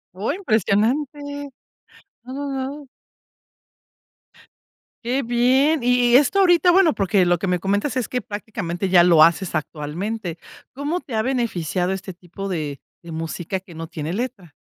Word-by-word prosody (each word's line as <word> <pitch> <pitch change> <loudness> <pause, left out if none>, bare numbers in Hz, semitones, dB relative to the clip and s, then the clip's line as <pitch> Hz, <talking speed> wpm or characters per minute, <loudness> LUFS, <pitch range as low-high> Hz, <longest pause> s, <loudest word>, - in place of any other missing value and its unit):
Oh, 205 +8 -1
impresionante. 260 - +1 1.0
No, 255 +1 -9
no, 285 +1 -4
no. 275 +1 -5 2.2
Qué 255 +3 0
bien. 255 +4 +2
Y 245 -1 +3
y - - +8
esto 290 +9 +4
ahorita, 355 -1 +5
bueno, 360 -3 +5
porque 195 -1 +2
lo 175 0 +3
que 195 - -4
me 180 -1 +1
comentas, 205 - -1
es 250 - -1
que 250 - -2
prácticamente 205 -4 -4
ya 180 -2 +6
lo 170 -3 +6
haces 170 +3 +4
actualmente, 170 +5 -4 0.4
¿cómo 295 +7 -2
te 260 - -10
ha 220 - +2
beneficiado 190 - -1
este 190 0 -5
tipo 185 +3 -8
de 150 -6 -3 0.2
de 170 - -9
música 165 +3 -4
que 180 -3 -15
no 165 0 -6
tiene 155 +2 -5
letra? 220 - -5
210 Hz, 150 wpm, -22 LUFS, 175-260 Hz, 2.2 s, y